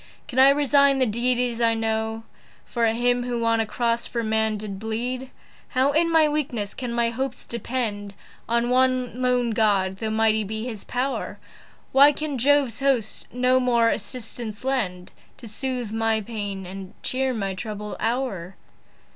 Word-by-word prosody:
Can 260 - -2
I 265 +1 +9
resign 280 -1 +4
the 260 - +3
deities 240 +1 0
I 230 -1 +3
know 220 0 -1 0.4
For 235 -2 0
him 245 +2 +2
who 240 -1 -2
on 230 0 +3
a 225 - 0
cross 235 +1 -1
for 235 -1 -3
man 220 0 +1
did 200 -2 -6
bleed? 245 +4 -3 0.4
How 265 +2 +2
in 335 +3 +2
my 320 -2 +5
weakness 255 -9 -2
can 250 -2 -5
my 235 0 +1
hopes 260 +1 -4
depend 220 -4 -4 0.3
On 235 +1 +1
one 255 -1 +1
lone 250 -2 +2
God, 200 -3 +2
though 220 +2 -3
mighty 220 0 +2
be 220 +2 -4
his 225 -5 -6
pow'r? 260 +2 -3 0.5
Why 280 +2 +7
can 295 -3 -3
Jove's 275 -2 +3
host 265 -6 0
no 250 +1 +3
more 235 -2 +3
assistance 225 -1 -5
lend, 195 -10 -2 0.3
To 235 - -11
soothe 245 0 -3
my 225 0 +1
pains, 205 -3 -5
and 190 +1 -9
cheer 265 +1 0
my 200 -5 -2
troubled 210 +1 -6
hour? 215 -7 -2
235 Hz, 160 wpm, -24 LUFS, 220-255 Hz, 0.5 s, I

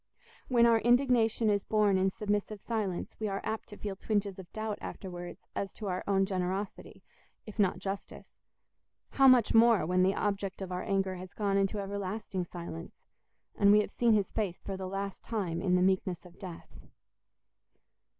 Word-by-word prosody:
When 240 -2 +5
our 230 -1 +5
indignation 240 -2 +3
is 200 -1 +1
borne 210 -2 +3
in 190 +1 +3
submissive 205 +1 -2
silence, 205 -5 -3
we 215 - -1
are 195 -1 -2
apt 220 - -4
to 205 - -10
feel 200 -2 -4
twinges 200 -1 -1
of 185 - -11
doubt 215 -1 -4
afterwards 175 -2 -7
as 195 - -3
to 215 - -8
our 180 0 -2
own 195 -1 +3
generosity, 190 +1 -4 0.4
if 215 0 -11
not 190 -3 +3
justice; 195 +1 -6 0.8
how 270 -1 +5
much 250 -4 +6
more 225 -6 +6
when 180 +2 +2
the 190 +1 +3
object 200 -2 -2
of 185 - -6
our 180 0 -2
anger 195 -1 0
has 185 0 -10
gone 200 -2 0
into 195 +1 +1
everlasting 200 -1 -3
silence, 170 -1 -8 0.5
and 200 0 +5
we 210 +1 +7
have - - -5
seen 235 -2 +3
his 205 -3 +1
face 200 -5 -2
for 195 - -3
the 190 0 -5
last 195 0 -4
time 185 -7 -2
in 180 -2 +2
the 180 - +3
meekness 185 -1 0
of 180 0 -15
death! 180 -4 -10
200 Hz, 180 wpm, -31 LUFS, 185-215 Hz, 0.8 s, we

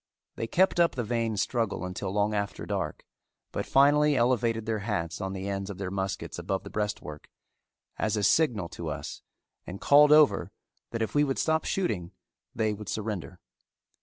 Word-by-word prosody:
They 115 - -3
kept 185 +6 +2
up 170 -1 +4
the 125 - -1
vain 115 -1 -1
struggle 110 -3 -1
until 90 +1 -4
long 105 +1 +1
after 100 -1 -3
dark, 95 -7 -3 0.5
but - - -3
finally 145 +2 +5
elevated 115 -3 +1
their 110 -1 -1
hats 85 -6 -3
on 95 0 -3
the 95 0 -5
ends 100 0 -3
of 100 - -6
their 95 -1 -4
muskets 95 -1 -3
above 95 - -2
the - - -9
breastwork, 105 -8 -4 0.7
as 110 0 0
a 105 - -1
signal 110 - +3
to 85 - -7
us, 75 -1 -6 0.5
and 95 +2 -7
called 145 +1 +6
over 150 -1 +5 0.4
that 115 -1 -2
if 110 - -4
we 145 - +4
would 135 -2 -1
stop 160 0 +1
shooting 100 - -2 0.4
they 110 -1 +1
would 105 -1 -8
surrender. 105 -5 -4
105 Hz, 175 wpm, -28 LUFS, 95-125 Hz, 0.7 s, called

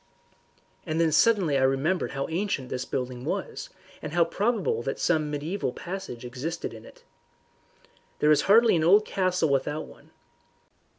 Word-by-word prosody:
And 155 +1 -2
then 165 -1 +3
suddenly 170 -5 +3
I - - 0
remembered 135 +7 +1
how 135 -1 -2
ancient 165 -7 -2
this 125 0 -3
building 125 -1 -4
was, - - -4 0.3
and - - -6
how 175 -1 +4
probable 200 - 0
that 135 +3 -3
some 155 -3 +1
mediaeval 150 0 -3
passage 175 -10 -7
existed 130 +7 -5
in 110 0 -11
it. - - -16 1.1
There 150 - +3
is 150 - +5
hardly 225 0 +6
an 160 - +1
old 200 +6 +5
castle 185 -4 0
without 140 +3 -1
one. - - -17
155 Hz, 155 wpm, -26 LUFS, 135-185 Hz, 1.1 s, hardly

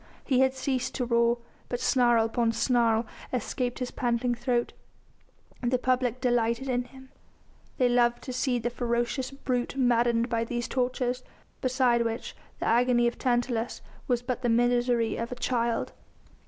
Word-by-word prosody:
He 260 -3 +2
had 265 0 +3
ceased 260 -1 -2
to 250 - -1
roar, 235 0 +3 0.3
but 245 - -2
snarl 240 -3 +3
upon 230 0 0
snarl 230 -1 +2 0.3
escaped 245 0 -2
his 250 -1 -4
panting 240 0 0
throat. 240 0 -1 0.9
The 250 0 +1
public 250 -1 0
delighted 240 0 +1
in 245 -1 0
him. 265 +1 -15 0.7
They 250 - +4
loved 240 0 +2
to 255 - -5
see 255 0 0
the 240 +1 -2
ferocious 240 +2 -1
brute 255 -3 -2
maddened 240 -2 +3
by 230 -2 0
these 240 +1 -3
tortures, 250 -1 -1 0.4
beside 255 -2 +2
which 230 +1 -4 0.2
the - - -4
agony 240 +1 +3
of 235 - -1
Tantalus 240 -2 -1 0.2
was 245 -3 +1
but 250 0 -3
the 245 - 0
misery 240 0 +2
of 230 +1 -4
a - - -3
child. 235 -2 -1
245 Hz, 155 wpm, -28 LUFS, 235-255 Hz, 0.9 s, They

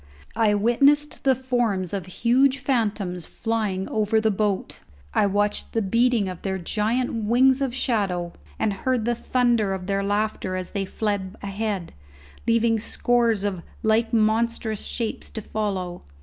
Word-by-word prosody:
I 220 -2 +3
witnessed 280 +9 +2
the 265 -1 +5
forms 240 -8 -1
of 195 -3 -3
huge 255 +7 +3
phantoms 210 - -1
flying 215 -4 -2
over 215 +1 +2
the 220 0 +2
boat; 200 -1 -1 0.3
I 205 - +3
watched 205 +1 -1
the 225 - +1
beating 230 +1 +2
of 180 -2 -6
their 190 -1 -2
giant 220 +5 -1
wings 260 +4 +4
of 260 -3 -1
shadow 195 -9 0 0.2
and 215 -2 0
heard 240 +3 -1
the 240 - +2
thunder 235 -5 +1
of 185 -1 -7
their 195 0 0
laughter 205 -2 -1
as 185 -1 -5
they 200 -2 -2
fled 200 -1 -2
ahead, 200 -3 -3 0.5
leaving 230 -1 +3
scores 235 -1 +1
of 195 -4 -2 0.2
like 225 +1 +2
monstrous 220 -1 +1
shapes 230 -2 -3
to - - -6
follow. 195 -5 -3
220 Hz, 150 wpm, -24 LUFS, 195-235 Hz, 0.5 s, the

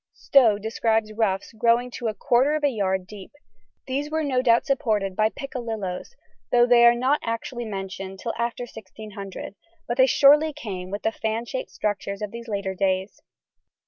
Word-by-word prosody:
Stow 235 -7 +4
describes 220 0 0
ruffs 210 -2 -1
growing 235 +2 +2
to 240 -1 -4
a 215 - -2
quarter 270 +4 +2
of 305 - -3
a 290 - +4
yard 190 -4 -1
deep; 200 +3 -11 0.5
these 280 +3 -2
were 315 0 -1
no 260 -3 +1
doubt 235 -2 +3
supported 215 -9 0
by 215 +2 +3
piccalilloes, 230 - -5 0.4
though 240 0 +5
they 240 -1 +5
are 235 - +6
not 260 +5 +1
actually 230 +1 -4
mentioned 195 -2 -6
till 230 +4 -4
after 235 +1 -2
1600, 210 -3 -9 0.3
but 240 - -2
they 260 0 +6
surely 295 +4 +5
came 190 -10 -6
with 205 +2 -5
the 220 - +1
fan 225 +1 -3
shaped 260 +2 -5
structures 200 -1 -3
of 210 - -4
these 235 +1 -8
later 200 -3 -2
days. 190 +1 -1
225 Hz, 175 wpm, -24 LUFS, 200-250 Hz, 0.5 s, are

